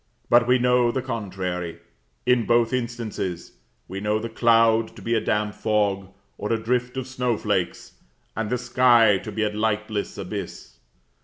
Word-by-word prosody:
But 120 0 +5
we 125 +1 +5
know 125 -1 +3
the 130 +1 -2
contrary, 95 -8 -4 0.5
in 125 -2 +2
both 120 0 +3
instances; 115 -8 -3 0.4
we 95 +2 -5
know 105 +1 0
the 115 +2 -4
cloud 115 -1 +3
to - - -12
be 115 - -1
a 110 - +2
damp 105 0 0
fog, 100 -3 0 0.3
or 105 - -3
a 115 - +2
drift 125 +2 -1
of 130 - -2
snow 125 -3 -1
flakes; 95 -5 -2 0.4
and 110 -2 -2
the 125 - 0
sky 120 -4 +4
to - - -7
be 110 - -1
a 105 -1 -1
lightless 105 -1 -2
abyss. - - -7
115 Hz, 165 wpm, -24 LUFS, 105-120 Hz, 0.5 s, But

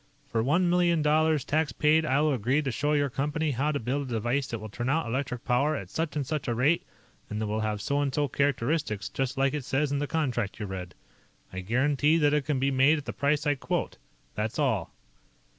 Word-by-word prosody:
For 115 - -1
one 160 +9 +2
million 175 -2 +3
dollars, 155 0 +2
tax 155 0 +1
paid, 155 +1 +3
I 135 +1 +2
will 155 -1 +2
agree 130 +5 +1
to 135 - -1
show 145 +5 0
your 145 -2 +1
company 150 +4 -1
how 140 +4 0
to 145 - -1
build 135 +4 -2
a - - -8
device 120 +5 0
that 115 - -4
will 110 0 -7
turn 120 +4 -4
out 155 0 +1
electric 125 0 -3
power 135 +5 +2
at - - -6
such 160 -1 -2
and 145 -2 -1
such 155 -1 -3
a 120 - 0
rate 145 +8 +2 0.5
and 105 - -3
that 110 - -1
will 105 +1 -2
have 105 -1 -2
so 140 0 0
and 140 -2 0
so 145 +2 0
characteristics, 135 -5 0
just 135 0 -2
like 135 0 +2
it 150 -2 -2
says 145 +2 0
in 140 - 0
the 145 - -2
contract 125 -11 -1
you 105 - -3
read. 95 -2 -6 0.6
I 95 - -4
guarantee 140 - +2
that 145 -2 +3
it 150 -2 +1
can 150 -2 0
be 135 +1 +1
made 135 +4 +4
at 145 - -6
the - - -4
price 145 +1 0
I 145 - +3
quote. 135 - -3 0.4
That's 105 +1 -3
all." - - 0
140 Hz, 235 wpm, -28 LUFS, 120-150 Hz, 0.6 s, made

